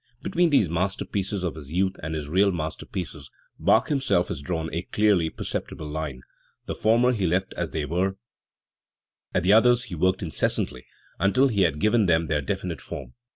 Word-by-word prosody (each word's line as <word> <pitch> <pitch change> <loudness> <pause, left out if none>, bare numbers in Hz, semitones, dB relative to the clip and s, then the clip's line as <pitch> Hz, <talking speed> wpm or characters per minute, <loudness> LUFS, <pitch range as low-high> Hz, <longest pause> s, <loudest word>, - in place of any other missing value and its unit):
Between 175 0 +2
these 135 - +4
masterpieces 95 +3 -2
of 90 - -1
his 75 -3 -10
youth 95 +2 +1
and 80 +1 -4
his 75 -2 -4
real 95 +5 +3
masterpieces 80 -3 -5 0.3
Bach 110 - +3
himself 130 - +1
has 70 - -4
drawn 80 +1 -3
a 85 - -1
clearly 100 -3 +2
perceptible 80 0 -5
line; 75 -4 -5 0.4
the - - -3
former 120 +3 +3
he 100 -7 0
left 95 +3 0
as 85 -2 -3
they 75 -2 -2
were; 90 +5 0 1.2
at 90 - +2
the 95 +3 +5
others 120 +2 +5
he 110 - -9
worked 95 +3 +1
incessantly 65 -5 -1 0.3
until 130 +8 +3
he 105 -5 +1
had 80 -5 +2
given 105 +4 +3
them 85 -1 +3
their 75 -2 0
definite 85 0 -3
form. 70 -4 -8
90 Hz, 175 wpm, -25 LUFS, 80-100 Hz, 1.2 s, the